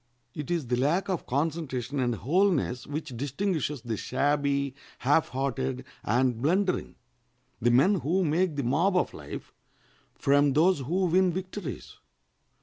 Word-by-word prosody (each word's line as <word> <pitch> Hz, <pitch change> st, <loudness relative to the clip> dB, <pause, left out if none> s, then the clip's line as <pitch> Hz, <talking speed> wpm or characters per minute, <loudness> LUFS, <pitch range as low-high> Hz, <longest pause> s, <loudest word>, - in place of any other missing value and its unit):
It 150 Hz, +1 st, -6 dB
is 170 Hz, -5 st, 0 dB
the 125 Hz, 0 st, 0 dB
lack 155 Hz, +10 st, +1 dB
of 185 Hz, -4 st, -2 dB
concentration 140 Hz, -2 st, -2 dB
and 120 Hz, -2 st, +1 dB
wholeness 140 Hz, -, +1 dB
which 145 Hz, -3 st, -5 dB
distinguishes 145 Hz, -, -2 dB
the 115 Hz, -2 st, -2 dB
shabby, 140 Hz, +1 st, 0 dB, 0.2 s
half 145 Hz, +5 st, +2 dB
hearted, 115 Hz, -, -2 dB, 0.2 s
and 120 Hz, +1 st, +1 dB
blundering—the 185 Hz, +6 st, +1 dB, 0.7 s
men 150 Hz, +12 st, +4 dB
who 180 Hz, +6 st, +1 dB
make 165 Hz, +1 st, +1 dB
the 140 Hz, -, -1 dB
mob 165 Hz, +11 st, +2 dB
of -, -, 0 dB
life—from 140 Hz, 0 st, -2 dB
those 170 Hz, +4 st, +4 dB
who 175 Hz, +8 st, 0 dB
win 180 Hz, +1 st, +3 dB
victories. 185 Hz, -1 st, -6 dB
145 Hz, 130 wpm, -28 LUFS, 130-175 Hz, 0.7 s, men